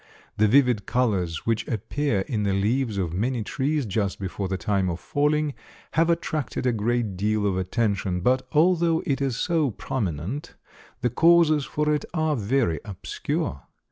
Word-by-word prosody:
The 110 - +4
vivid 125 -3 +3
colors 95 -10 0
which 115 -1 0
appear 115 +1 -1
in 105 +2 -2
the 100 -1 +1
leaves 110 +3 0
of 90 -4 -1
many 115 +5 -1
trees 140 +5 -1
just 100 -1 -1
before 95 0 -3
the 95 0 -2
time 95 -2 0
of 85 0 -3
falling 150 +3 0 0.4
have 165 +1 +2
attracted 155 -6 -1
a 125 - +3
great 115 -2 -1
deal 105 +2 0
of 100 -2 +1
attention, 95 -1 -1
but 130 +6 +3
although 165 0 +3
it 140 -1 0
is 135 -4 0
so 165 -5 +1
prominent, 105 - -4 0.5
the 120 - +1
causes 160 0 +4
for 150 0 0
it 150 - -1
are 155 -2 +1
very 115 - +1
obscure. 90 -8 -4
115 Hz, 160 wpm, -25 LUFS, 100-145 Hz, 0.5 s, The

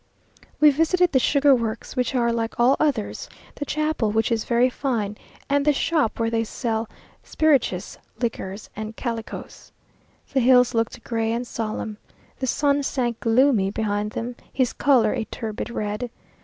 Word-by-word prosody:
We 300 -1 +7
visited 330 +4 +2
the 260 - +4
sugar 280 +2 +4
works, 230 -1 -2
which 250 0 0
are 235 -1 +2
like 230 0 -3
all 250 +3 +5
others, 275 -9 -1 0.2
the 290 - -5
chapel, 305 -6 0
which 220 +2 +1
is 225 -1 0
very 240 +1 +3
fine, 235 -6 -2 0.3
and 285 0 +2
the 295 0 +4
shop 295 -5 0
where 225 0 0
they 225 0 +1
sell 225 0 -3 0.3
spirituous 310 -4 +1 0.2
liquors 215 -4 -4
and 215 +1 -6
calicoes. 230 -3 -6 0.6
The 270 - +3
hills 250 0 +5
looked 225 0 -1
gray 225 -1 -1
and 235 +2 -2
solemn. 215 -2 -4 0.4
The 260 - -2
sun 285 +2 +2
sank 245 -4 -1
gloomy 230 -4 +3
behind 210 0 -2
them, 240 +2 -4 0.2
his 255 -2 0
colour 245 -7 +3
a 235 -4 -2
turbid 220 0 -5
red. 215 +1 -3
235 Hz, 155 wpm, -23 LUFS, 225-275 Hz, 0.6 s, We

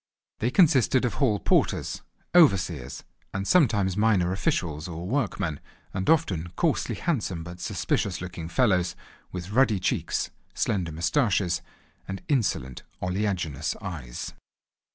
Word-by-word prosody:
They 115 - +1
consisted 130 - +4
of 120 - 0
hall 110 -8 +2
porters, - - +1 0.3
overseers, 95 - +3 0.3
and 95 +1 -2
sometimes 105 - +3
minor 105 -4 +3
officials, 80 -5 -1
or 85 0 -6
workmen, 100 - -1 0.3
and 95 -1 -1
often 90 - +2
coarsely - - +1
handsome 105 - -1
but 85 +1 -9
suspicious 90 +1 -1
looking 90 -2 -6
fellows 90 -7 +2 0.4
with 90 +1 -6
ruddy 115 -4 +3
cheeks, - - -1 0.2
slender 90 -5 0
moustaches, 90 - +1 0.5
and 95 0 -5
insolent 95 - 0 0.2
oleaginous 90 -6 -1
eyes. 80 - -6
95 Hz, 115 wpm, -26 LUFS, 85-115 Hz, 0.5 s, consisted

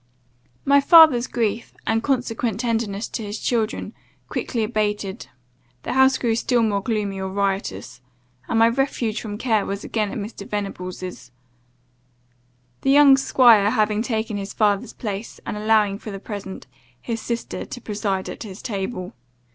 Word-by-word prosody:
"My 280 0 +5
father's 305 -5 +7
grief, 225 -1 -2
and 225 0 +1
consequent 240 -4 -1
tenderness 225 -3 -1
to - - -4
his 205 +1 -5
children, 225 -3 -1 0.4
quickly 230 -3 -2
abated, 210 -3 -2 0.6
the - - -3
house 265 0 +5
grew 230 -2 0
still 235 +1 +1
more 205 -3 +1
gloomy 205 -3 -2
or 190 - -3
riotous; 195 -6 -3 0.5
and - - 0
my 225 0 +6
refuge 235 -3 -1
from 210 -2 -6
care 220 -3 +1
was 200 0 -4
again 215 -3 -1
at - - -5
Mr. 205 -1 -7
Venables'; 185 -7 -5 1.5
the - - 0
young 280 0 +8
'squire 235 -6 +5
having 215 -2 +1
taken 220 -2 -2
his 195 0 -5
father's 205 -2 +1
place, 210 -1 -6
and - - -4
allowing, 210 -1 +2
for 220 - -8
the 195 -1 -6
present, 200 -2 -7 0.3
his 230 -2 -4
sister 235 -1 -4
to 245 - -8
preside 200 -4 -2
at - - -7
his 205 -3 -8
table. 195 -2 -4
215 Hz, 150 wpm, -22 LUFS, 200-235 Hz, 1.5 s, young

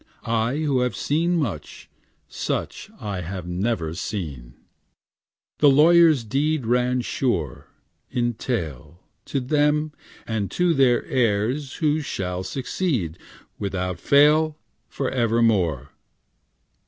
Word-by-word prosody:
I 115 +2 0
who 145 -4 +1
have 125 0 0
seen 170 +4 0
much, 110 - -4 0.4
Such - - -4
have 100 -4 -4 0.2
I - - -10
never 90 -3 -1
seen. 70 - -5 1.0
'The 145 - +6
lawyer's 160 -1 +6
deed 140 +4 0
Ran 125 +2 +1
sure, 120 - -2 0.4
In 120 -1 0
tail, 85 - -5 0.2
To 140 - -2
them, 150 +3 +1 0.3
and 105 -4 -2
to 175 - +1
their 130 -4 +3
heirs 125 +2 0
Who 155 -1 +1
shall 90 -9 -3
succeed, 120 - -2 0.4
Without 90 -3 -3
fail, 150 - +4 0.3
Forevermore. 115 - 0
120 Hz, 105 wpm, -23 LUFS, 95-145 Hz, 1.0 s, The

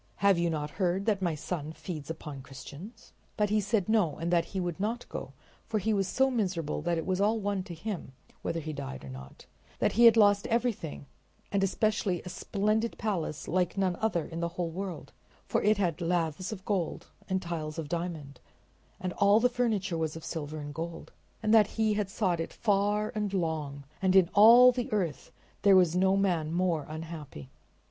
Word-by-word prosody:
Have 200 -3 +3
you 170 0 +1
not 150 -2 -3
heard 185 +2 +1
that 210 -3 +1
my 170 -4 0
son 155 0 -4
feeds 160 -5 -7
upon 150 -4 -6
Christians?" 140 - -11 0.2
But 210 -2 +1
he 215 0 +3
said 205 -1 0
no 215 -8 +2
and 170 +2 -2
that 170 -1 +3
he 195 - -4
would 175 -2 -3
not 225 +4 -2
go, - - -6 0.3
for 225 - 0
he 215 +2 0
was 195 -2 +1
so 265 +4 +2
miserable 185 - -1
that 170 +1 0
it 165 - -3
was 185 0 0
all 220 +2 +2
one 200 -2 -1
to 170 - -7
him 175 -5 -5 0.3
whether 165 - -2
he 155 0 -5
died 135 - -6
or - - -8
not; 65 0 -11 0.3
that - - +2
he 235 +2 +5
had 230 -1 +8
lost 205 -2 +5
everything, 225 - -1 0.5
and 200 -1 +1
especially 195 -2 +1
a 180 - -7
splendid 210 +4 -1
palace 175 -8 -3
like 180 +1 0
none 190 -2 +1
other 185 -8 0
in 165 - -6
the 170 - 0
whole 170 0 -3
world, 185 +1 -6 0.3
for - - 0
it 215 0 +3
had 175 -4 0
laths 170 +1 -1
of 195 -3 -7
gold 190 -5 -1 0.2
and 190 0 +1
tiles 160 -2 -4
of 160 -2 -4
diamond 160 -5 -4 0.6
and 185 -1 -3
all 200 +2 +6
the 250 +2 +3
furniture 210 -8 0
was 160 -1 -2
of 165 - -8
silver 155 -2 -5
and 145 -1 -6
gold; 165 +2 -6 0.3
and 215 - +2
that 215 -2 +7
he 220 -1 +3
had 205 -2 -1
sought 190 -5 0
it 165 - -3
far 210 0 +1
and 210 -2 -2
long, 155 -5 -2 0.2
and 190 -1 +2
in 185 -3 +5
all 235 +4 +9
the 250 +1 -4
earth 180 -9 -2 0.3
there 200 -1 +6
was 180 -2 +4
no 190 +1 +3
man 175 -6 +1
more 170 -3 0
unhappy. 155 - -8
185 Hz, 200 wpm, -29 LUFS, 160-210 Hz, 0.6 s, all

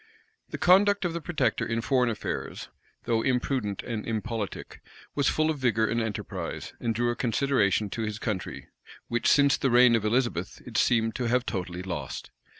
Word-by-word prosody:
The - - -5
conduct 200 +2 +4
of 170 - -1
the 170 - -4
protector 160 0 0
in 115 0 -1
foreign 125 0 +2
affairs, 110 - -4 0.3
though 115 -1 +1
imprudent 125 -5 -1
and 115 -3 -4
impolitic, 110 -2 -4 0.3
was 140 -1 +2
full 155 0 +2
of 150 - -5
vigor 115 -3 +2
and 115 +1 0
enterprise, 110 -3 -5
and 115 -1 -1
drew 120 +1 +1
a - - -3
consideration 115 -5 +1
to 115 - -3
his 105 -1 -3
country, 105 -4 -4 0.4
which, 120 0 0
since 140 -1 +5
the 135 - +1
reign 120 -1 +6
of 115 - 0
Elizabeth, 110 -5 0
it - - -10
seemed 115 -2 +2
to 125 - -2
have 125 +1 +1
totally 90 -2 -4
lost. 90 -2 -5
120 Hz, 175 wpm, -27 LUFS, 110-130 Hz, 0.4 s, reign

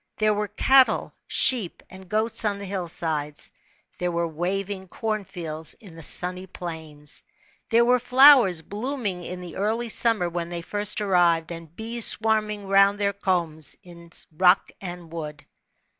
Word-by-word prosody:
There 215 0 +2
were 210 0 -2
cattle, 260 +6 +3
sheep/ 230 -9 +3
p - - -14
id 190 -1 -14
goats 220 +3 0
on 205 -2 -1
the 200 - -8
hillsides; 165 -6 -4 0.5
there 180 - -1
were 170 0 -1
waving 190 +4 -4
corn 215 +2 -3
fields 160 -4 -4
in 200 -8 -15
the 165 - -11
sunny 180 +4 +2
plains; 160 -5 -8 0.5
there 235 0 +4
were 250 +1 +3
flowers 250 - +6
blooming 210 - -4
in 180 +1 -7
the 175 -3 -9
early 225 +4 -1
summer 225 -5 +1
when 170 0 -4
they 170 -1 -6
first 205 +3 0
arrived, 175 -4 +2
and 165 -1 -10
bees 230 +2 0
swarming 215 -2 0
round 195 +1 +4
their 200 -1 0
combs 170 -6 -1
in 170 -1 -14 0.3
rock 180 +3 +3
and 175 -3 -8
w^ood. 150 -3 -7
185 Hz, 155 wpm, -24 LUFS, 170-215 Hz, 0.5 s, flowers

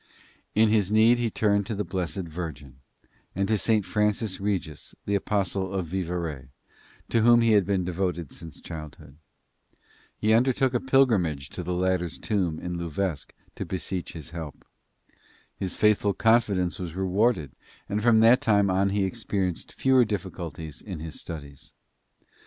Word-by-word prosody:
In 110 +1 +5
his 105 -3 +2
need 115 +3 +5
he 120 -1 +1
turned 100 -2 +1
to 110 - -3
the 105 - -1
Blessed 90 +1 -3
Virgin 75 -5 -7 0.6
and 100 +1 0
to 110 - +3
St. 110 -1 +1
Francis 105 +1 0
Regis, 95 -7 -3
the 100 - -1
Apostle 95 -1 -1
of 95 -2 -2
Vivarais, 85 -7 -3 0.6
to 115 - +2
whom 120 +1 +6
he 115 -1 +3
had 100 -4 +4
been 95 -2 +1
devoted 90 -3 -2
since 80 -1 -11
childhood. 75 -3 -9 1.0
He 110 +1 +2
undertook 130 +2 +3
a 125 - +2
pilgrimage 105 - +2
to - - -5
the 90 +1 -3
latter's 90 -2 0
tomb 90 -7 -1
at 90 - -3
Louvesc 85 -2 -3 0.2
to - - -4
beseech 95 -1 -4
his 80 -2 -8
help. 80 -4 -8 0.9
His 95 -2 -4
faithful 105 -2 +3
confidence 105 -5 +2
was 85 -3 -5
rewarded 95 - +1 0.4
and 105 +1 -1
from 115 -1 +5
that 120 +4 +6
time 100 -6 +3
on 95 +1 +2
he 100 0 0
experienced 95 -3 -2
fewer 130 -1 +4
difficulties 85 - -5
in - - -7
his 80 0 -7
studies. 70 -5 -8
95 Hz, 150 wpm, -26 LUFS, 85-105 Hz, 1.0 s, whom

